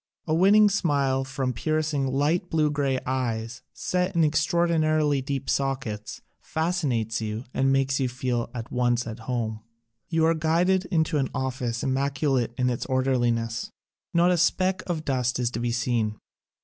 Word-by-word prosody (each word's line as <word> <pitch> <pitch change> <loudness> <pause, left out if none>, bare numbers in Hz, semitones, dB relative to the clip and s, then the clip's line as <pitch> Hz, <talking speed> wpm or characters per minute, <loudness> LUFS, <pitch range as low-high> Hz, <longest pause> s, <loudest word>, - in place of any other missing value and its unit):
A 155 - 0
winning 200 +5 +6
smile 140 -9 +1
from 135 -1 -2
piercing 155 +1 0
light 150 +7 0
blue 155 -2 +2
gray 140 -2 0
eyes, 120 -2 -2
set 180 +1 -1
in 165 - +4
extraor 160 +3 +2
dinarily 155 -4 +2
deep 135 -1 -3
sockets, 130 -6 -2 0.2
fascinates 145 - -1
you 110 +1 -3
and 135 0 +2
makes 135 0 +1
you 130 -2 +1
feel 125 -1 -2
at 115 -2 -7
once 120 -1 +1
at 115 0 -6
home. 110 -3 -2 0.5
You 160 -1 +2
are 165 - +4
guided 170 +4 +2
into 160 -4 +1
an 135 - 0
office 125 -3 -2
immaculate 135 -2 0
in 125 0 +1
its 120 - -3
orderliness. 120 -4 0 0.4
Not 175 +1 +4
a 180 - +2
speck 185 +2 +2
of 160 -3 -3
dust 125 -3 0
is 120 -1 0
to 115 - -4
be 120 0 -1
seen. 115 -3 0
135 Hz, 160 wpm, -26 LUFS, 120-160 Hz, 0.5 s, winning